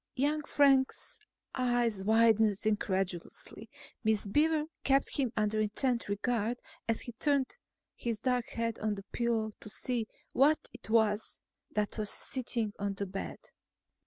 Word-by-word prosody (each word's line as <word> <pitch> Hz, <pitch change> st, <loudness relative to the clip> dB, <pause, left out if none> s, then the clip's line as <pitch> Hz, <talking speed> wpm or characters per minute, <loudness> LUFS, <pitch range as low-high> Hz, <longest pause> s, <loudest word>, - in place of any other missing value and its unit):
Young 295 Hz, +3 st, +1 dB
Frank's 275 Hz, -2 st, +2 dB, 0.3 s
eyes 240 Hz, -5 st, +1 dB
widened 220 Hz, -1 st, +4 dB
incredulously. 190 Hz, -4 st, -2 dB, 0.3 s
Miss 215 Hz, -2 st, +1 dB
Beaver 300 Hz, +8 st, +3 dB, 0.2 s
kept 275 Hz, 0 st, +2 dB
him 260 Hz, -5 st, +1 dB
under 215 Hz, 0 st, +1 dB
intent 235 Hz, +2 st, 0 dB
regard 230 Hz, +3 st, 0 dB, 0.3 s
as 225 Hz, -1 st, 0 dB
he 240 Hz, -, -6 dB
turned 280 Hz, -, +1 dB, 0.4 s
his 230 Hz, -3 st, -3 dB
dark 250 Hz, -2 st, 0 dB
head 230 Hz, -1 st, -2 dB
on 215 Hz, -1 st, 0 dB
the 195 Hz, -1 st, -9 dB
pillow 230 Hz, -2 st, 0 dB
to -, -, -8 dB
see 235 Hz, +1 st, -1 dB, 0.3 s
what 295 Hz, +4 st, +3 dB
it 245 Hz, -2 st, -11 dB
was 220 Hz, -1 st, +2 dB, 0.4 s
that 210 Hz, +1 st, -1 dB
was 210 Hz, -1 st, -1 dB
sitting 235 Hz, -5 st, 0 dB
on 200 Hz, 0 st, -2 dB
the 200 Hz, -, -2 dB
bed. 195 Hz, +1 st, -7 dB
230 Hz, 135 wpm, -32 LUFS, 210-255 Hz, 0.4 s, widened